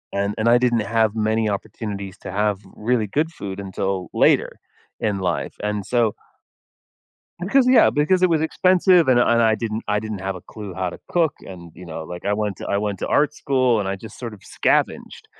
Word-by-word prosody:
and 100 +1 -1
and 110 - 0
I 120 +1 +6
didn't 120 -2 +2
have 110 0 +1
many 110 0 +1
opportunities 100 -1 -5
to - - -7
have 105 0 0 0.2
really 115 0 0
good 155 +10 -1
food 100 - -7
until 95 -1 -3
later - - +2 0.4
in 105 -3 -1
life, 90 -3 -2
and 105 -1 -2
so 115 -2 +1 1.3
Because 245 +9 +3
yeah, 255 - +6
because 180 +6 +2
it 185 - +4
was 160 - +2
expensive, 180 0 +3
and 125 -2 +5
and 120 -1 +4
I 110 -1 +3
didn't 110 0 -3
I 105 - +2
didn't 110 -2 -5
have 95 0 -3
a - - -9
clue 105 -3 -9
how 95 0 -2
to - - -11
cook, 165 -3 +1
and, 85 -3 -11
you 90 - -11
know, 80 -2 -7
like, 90 +3 -8
I 100 - +1
went 105 -2 -1
to - - -6
I 100 - +1
went 100 -2 -2
to - - -3
art 150 0 +2
school, 130 -7 +1
and 95 - -3
I 100 - -2
just 110 +2 -12
sort 120 -3 -6
of 100 - -17
scavenged, - - -1
110 Hz, 210 wpm, -22 LUFS, 100-125 Hz, 1.3 s, I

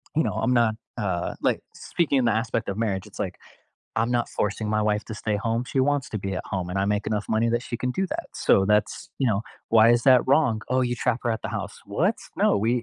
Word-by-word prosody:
you 160 - +3
know, - - -1
I'm 125 - +1
not, 115 -3 +3 0.2
uh, 95 -5 -2
like - - +1
speaking 140 -7 0
the 115 - +4
aspect 115 0 -1
of 100 - -3
marriage, 100 -4 -1
it's - - -14
like, - - -3 0.6
I'm 115 +2 +1
not 120 -1 +1
forcing 105 +1 -2
my 110 0 +1
wife 105 0 0
to 110 - -6
stay 105 0 -1
home, 115 +3 -1
she 135 +1 0
wants 140 -2 +1
to 110 - -3
be 95 0 -3
at 95 - -4
home, 90 -2 -3
and 95 - -2
I 95 - +2
make 105 0 0
enough 105 -1 -2
money 110 +1 +2
that 120 +1 0
she 120 - -4
can 125 +2 -2
do 190 +8 -1
that. - - -4
So, 95 - +3
that's, 105 0 +1
you 135 - +1
know, 105 -1 +1 0.3
why 115 0 +6
is 120 0 +3
that 130 -2 +7
wrong? 130 -5 +3
"Oh, 130 0 +2
you 120 -1 0
trap 120 +1 0
her 120 - 0
at 110 - -2
the - - -3
house." - - -5
What? - - +1 0.2
No, - - +3
we 115 +4 +1
115 Hz, 255 wpm, -25 LUFS, 105-125 Hz, 0.6 s, that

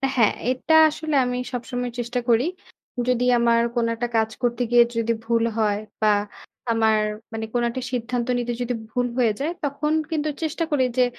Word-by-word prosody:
হ্যাঁ 230 -5 +4 0.2
এটা 260 +5 0 0.2
আসলে 310 0 -3
আমি 250 0 -2 0.2
সবসময় 245 0 -3
চেষ্টা 240 +1 -2
করি। 235 +1 +4 0.6
যদি 250 -1 +2
আমার 235 0 +3
কোন 235 -1 +2
একটা 240 +1 -2
কাজ 220 0 +2
করতে 240 0 0
গিয়ে 240 0 +7
যদি 230 0 0
ভুল 230 0 +2 0.2
হয় 210 -2 +2 0.2
বা 215 - +3 0.6
আমার 220 -1 +3 0.3
মানে 225 0 -3
কোন 240 - +1
একটা 255 +2 -4
সিদ্ধান্ত 245 -1 -2
নিতে 240 0 -2
যদি 245 0 -1 0.2
ভুল 245 +1 0
হয়ে 240 -3 +3
যায়। 295 +4 -1
তখন 290 +2 -1 0.2
কিন্তু 310 -1 0
চেষ্টা 320 +2 -1
করি 285 -3 +3
যে 255 - +6
245 Hz, 175 wpm, -23 LUFS, 230-255 Hz, 0.6 s, গিয়ে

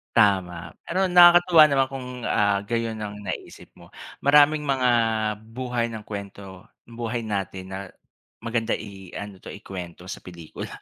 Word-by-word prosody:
Tama, 95 -5 +2
pero 190 +2 0
nakakatuwa 175 -2 +7
naman 135 -1 +3
kung, 135 -1 -7 0.2
ah, 100 -1 +2
gayon 115 -1 -2
ang 105 -1 -5
naiisip - - -7
mo. - - -15 0.3
Maraming 150 +2 +5
mga 130 -2 +2 0.7
buhay 125 -2 -1
ng 110 -2 -7
kuwento 100 -2 -9 0.2
buhay 115 0 -5
natin 95 -3 -4
na 95 - -4 0.7
maganda 115 -1 -1
i-ano 100 -1 -9
'to, - - -14
ikuwento 90 -3 -8
sa - - -6
pelikula. 85 -3 -9
110 Hz, 135 wpm, -24 LUFS, 95-130 Hz, 0.7 s, nakakatuwa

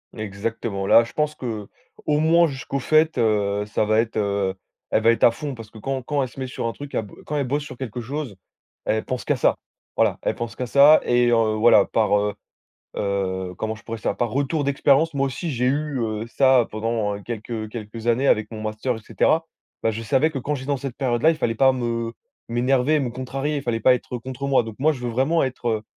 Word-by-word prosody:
Exactement! 105 -1 -4
Là, 115 - +7
je 115 - -9
pense 150 0 -1
qu'au 110 -5 -5 0.4
moins 160 +3 +4
jusqu'aux 135 -1 -4
fêtes, 155 +2 +3
heu, 105 -3 +1
ça 105 - -1
va 110 +1 +2
être, 115 -1 -1
heu 100 -2 0 0.4
elle 110 - +1
va 115 - +6
être 115 - +3
à 115 - +7
fond 145 +3 -5
parce 115 -3 -10
que 110 - -13
quand 135 +3 -3
quand 145 +1 0
elle 130 - -4
se 135 - -13
met 130 - -3
sur 125 - -5
un 115 - 0
truc, 145 +2 -9
elle - - +1
bo 100 - -15
quand 150 - -4
elle 145 -2 0
bosse 145 +3 -1
sur 140 - -10
quelque 125 -2 -5
chose, 130 -3 -5 0.5
elle 110 0 0
pense 130 -1 -4
qu'à - - +2
ça. - - +2 0.4
Voilà, - - +2
elle - - -1
pense 115 0 -5
qu'à 125 - -3
ça 140 +5 +6
et 120 0 +3
heu, 115 -2 +3
voilà. 110 -2 +6
Par 105 -2 +2
heu, 105 0 -1 0.6
heu, 95 -2 -2
comment 110 0 -3
je - - -17
pourrais 115 0 -5
ça? - - -1
Par 120 -2 -1
retour 140 +4 0
d'expérience, 140 +3 +3
moi 135 0 +1
aussi 145 +5 -4
j'ai 125 0 0
eu, 145 0 0
heu, 110 -1 -2
ça 130 0 +4
pendant, 110 -1 -1
heu, 100 - -8
quelques, 115 0 -7
heu, 110 -2 -3
quelques 115 +1 -6
années 120 +4 +2
avec 105 -5 +2
mon 110 -1 -7
master 110 +3 -2
et - - -7
cetera. 160 +8 +1 0.4
Bah, 110 - +2
je 115 - -5
savais 135 +8 +2
que 140 - -3
quand 145 +3 -2
j'étais 130 +1 -8
dans 140 - +1
cette 130 -2 -6
période-là, 130 +4 +2
il 160 - -1
fallait 115 -7 0
pas 130 +3 +5
me 115 -2 -2 0.4
m'énerver, 130 +5 +2
me 130 -4 -1
contrarier, 135 +4 -3
il 140 - -6
fallait 120 -3 -1
pas 130 - +5
être 125 0 -5
contre 130 +3 -5
moi. 135 -3 +4
Donc, 110 -2 -7
moi, 155 +2 +4
je 130 - -8
veux 120 -1 -3
vraiment 135 +8 +2
être 130 -2 -3
heu 110 -1 0
120 Hz, 240 wpm, -23 LUFS, 110-140 Hz, 0.6 s, Là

